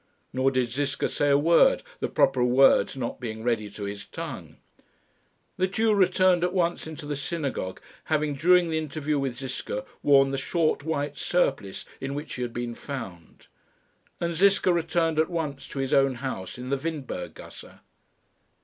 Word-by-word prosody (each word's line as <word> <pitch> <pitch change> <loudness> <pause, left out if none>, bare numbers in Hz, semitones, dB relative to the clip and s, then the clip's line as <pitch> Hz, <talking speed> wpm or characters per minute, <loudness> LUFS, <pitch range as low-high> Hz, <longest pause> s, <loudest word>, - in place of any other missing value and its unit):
Nor 130 +1 +2
did 130 -3 0
Ziska 140 +2 0
say 145 - 0
a 140 - +5
word, 165 +4 +4 0.2
the - - -1
proper 125 - +2
words 130 +2 +4
not 120 -3 -4
being 110 -3 -5
ready 115 -3 0
to 100 +1 -8
his 100 0 -5
tongue. - - -8 1.0
The 185 - +2
Jew 220 +3 +2
returned 185 -2 +3
at 180 0 0
once 175 -3 0
into 160 -1 -8
the 145 0 -3
synagogue, 140 - -3 0.3
having 155 -1 0
during 175 +4 +4
the 160 - +1
interview 150 -1 -2
with 135 -3 -2
Ziska 125 -5 -4 0.2
worn 135 -1 +5
the 135 - -1
short 155 0 0
white 145 -2 -2
surplice 135 - 0
in 135 +1 -4
which 150 +2 -5
he 125 - -5
had 120 -1 -2
been 120 0 -4
found; 115 - -8 0.7
and 170 0 -1
Ziska 190 +1 +4
returned 165 -1 +1
at 160 - +2
once 150 -6 -4
to - - -9
his 135 -1 -1
own 135 -1 +4
house 120 -7 -5
in 125 +1 -6
the 140 - +2
Windberg 140 - -5
gasse. - - -12
140 Hz, 170 wpm, -26 LUFS, 125-165 Hz, 1.0 s, a